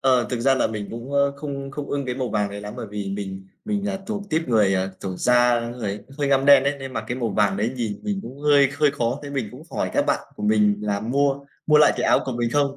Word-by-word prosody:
Ờ, 130 -2 +3
thực 125 -2 -2
ra 135 +2 +4
là - - +2
mình 105 -2 -5
cũng, 120 +4 -7
ờ, 140 0 +3
không 140 -2 -5
không 140 +1 -5
ưng 140 -1 -2
cái 125 - -2
màu 130 -1 -2
vàng 105 -2 0
đấy 100 0 -6
lắm. 105 0 -7
Bởi 110 - -5
vì 105 -1 -4
mình 95 -1 -6 0.2
mình 205 -1 -2
là 195 -1 -2
thuộc 205 -1 -3
típ 160 -2 0
người, 105 -4 +3
ờ, 95 0 0
kiểu 95 -2 -4
da, 125 +2 +4
ơ, 115 - -4
người 105 -3 -3
cũng 135 - -16
hơi 145 -1 0
ngăm 135 -1 +3
đen 140 -1 +8
ấy, 140 +1 +1
nên 135 -1 -7
mặc - - -3
cái 120 - -2
màu 120 -3 -1
vàng 100 -1 +2
đấy 110 +5 -1
nhìn 110 -4 -3
nhìn 205 -2 -2
cũng 130 +3 -9
hơi 145 -2 +5
hơi 150 -1 +4
khó. 125 -2 -1
Thế 145 - -7
mình 130 -7 -2
cũng 130 +6 -11
hỏi - - -2
các - - +1
bạn - - +1 0.2
của - - -8
mình 105 -1 +3
là 100 -1 -1
mua 140 +4 0 0.2
mua 150 - +5
lại 150 - +6
cái - - -1
áo - - +5
của 130 - -3
mình 120 -1 -1
không? 140 0 +1
125 Hz, 290 wpm, -23 LUFS, 105-140 Hz, 0.2 s, đen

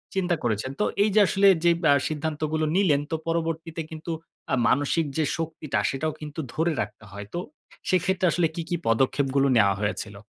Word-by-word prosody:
চিন্তা 180 -2 +1
করেছেন। 115 +3 -1
তো - - +2 0.2
এই 215 - +2
যে - - +7
আসলে 200 0 +4 0.2
যে 170 - +5 0.2
আ - - +7 0.2
সিদ্ধান্তগুলো 155 0 -2
নিলেন 160 -8 +3
তো - - +1
পরবর্তীতে 165 0 -2
কিন্তু 160 +1 -6 0.4
আ - - +5
মানসিক 145 +4 +2
যে 160 - +2
শক্তিটা 160 -3 -2
সেটাও 150 +3 -2
কিন্তু 150 +1 -7
ধরে 165 +2 +1
রাখতে - - -7
হয়। 100 +1 -7
তো 175 - -2 0.5
সেক্ষেত্রে 185 0 +1
আসলে 175 -2 +2
কী, 170 - -2
কী 175 - 0
পদক্ষেপগুলো 135 +3 +2
নেওয়া 100 -2 +4
হয়েছিল? 105 -1 -3
155 Hz, 175 wpm, -25 LUFS, 135-170 Hz, 0.5 s, যে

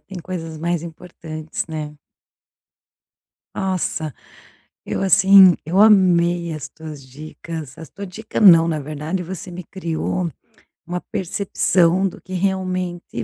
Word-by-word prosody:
tem 195 -1 -10
coisas 165 -2 -6
mais 170 0 -1
importantes, 160 -2 -7
né. 150 -2 -6 1.6
Nossa, 180 -6 -2 0.7
eu - - -3
assim, 190 -1 +7
eu 175 +5 +1
amei 175 -5 +4
as 155 -2 -6
tuas 155 -3 -10
dicas, 155 +1 -9
as 160 -3 -10
tua 200 +6 -8
dica 205 +4 -6
não, 170 -6 +7
na 160 -2 -1
verdade, 155 +5 -4
você 185 +1 -7
me 180 +1 -7
criou 170 -1 -3 0.5
uma 180 +1 -4
percepção 185 -1 +1
do 185 - -9
que 185 - -10
realmente 185 -6 -2
175 Hz, 120 wpm, -20 LUFS, 160-185 Hz, 1.6 s, assim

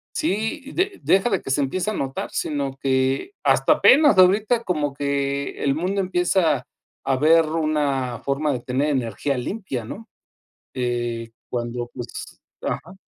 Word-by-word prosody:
Sí, 265 +1 -2
de 380 +2 -1
deja 195 +5 +3
de 195 - 0
que - - -5
se 140 - +2
empieza 180 +9 -1
a - - -4
notar, 135 -8 -4
sino 140 -3 -2
que, 135 - 0
hasta - - +4
apenas 290 -6 +6
ahorita, 205 +6 +4
como 150 -8 -1
que 140 0 -2
el 140 -1 +2
mundo 185 +5 -1
empieza 180 -6 +1 0.4
a 135 - +1
ver 160 +4 +5
una 150 -6 -1
forma 140 +2 -1
de 130 - -2
tener 130 +5 -1
energía 135 +1 -1
limpia, 130 - -4
¿no?, 220 - -9 0.7
eh, 120 -2 -2 0.2
cuando, 120 0 -3
pues, 120 -2 -8 0.2
ajá. 180 +4 -4
145 Hz, 145 wpm, -23 LUFS, 130-190 Hz, 0.7 s, apenas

